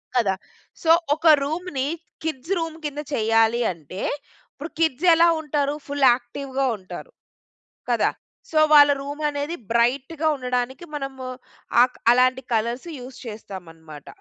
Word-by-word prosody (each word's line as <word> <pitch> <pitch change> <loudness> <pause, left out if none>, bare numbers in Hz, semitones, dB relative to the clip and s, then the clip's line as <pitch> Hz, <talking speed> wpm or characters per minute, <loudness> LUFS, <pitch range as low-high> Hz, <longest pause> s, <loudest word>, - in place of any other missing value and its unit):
కదా! 205 -6 +2 0.5
సో 325 - 0 0.3
ఒక 330 +2 -1 0.2
రూమ్‌ని 300 -3 -3 0.4
kids 320 +2 -3
room 325 -1 -4
కింద 295 0 -4
చెయ్యాలి 225 0 +3
అంటే, 170 +3 -9 0.5
ఇప్పుడు 305 +4 -8
కిడ్స్ 325 +1 +1
ఎలా 335 +1 +5
ఉంటారు? 290 -1 -1
ఫుల్ 285 -1 +1
యాక్టివ్‌గా 265 +2 -3
ఉంటారు, 190 - -10 0.8
కదా! - - +2 0.4
సో 315 - +3
వాళ్ళ 290 -1 +8
రూమ్ 285 +2 -6
అనేది 290 +3 -3 0.2
బ్రైట్‌గా 265 +7 +1
ఉండడానికి 250 +4 -3
మనము 270 -2 -5 0.6
అ - - +8 0.3
అలాంటి 255 +1 +3
కలర్స్ 235 +6 -1
యూజ్ 250 +1 -10
చేస్తామనమాట. 165 -8 -10
265 Hz, 120 wpm, -23 LUFS, 235-295 Hz, 0.8 s, వాళ్ళ